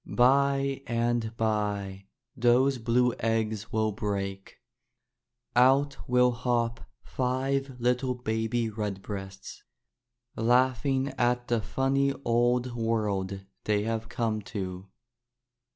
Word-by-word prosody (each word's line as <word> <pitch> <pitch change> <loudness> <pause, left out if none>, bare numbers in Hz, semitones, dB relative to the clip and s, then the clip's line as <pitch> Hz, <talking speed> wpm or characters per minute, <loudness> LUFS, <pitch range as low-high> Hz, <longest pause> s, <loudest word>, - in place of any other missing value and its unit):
By 135 +2 +3
and 115 -1 -1
by, 100 -3 -1 0.3
those 125 +2 +3
blue 120 +1 +2
eggs 110 -1 -1
will 110 0 +1
break. 100 -2 -4 1.0
Out 135 +3 +4
will 125 0 +4
hop 120 -1 -1 0.2
five 135 +1 -1
little 125 +1 +1
baby 115 0 -1
redbreasts, 100 -2 -6 0.7
laugh 125 +2 +2
ing 135 0 +1
at 120 0 +1
the 120 -2 +2
funny 135 +4 +1
old 120 +1 +2
world 100 -4 -1 0.2
they 105 -1 +1
have 115 0 -3
come 110 -3 -1 0.2
to. 95 0 -5
115 Hz, 100 wpm, -28 LUFS, 110-125 Hz, 1.0 s, Out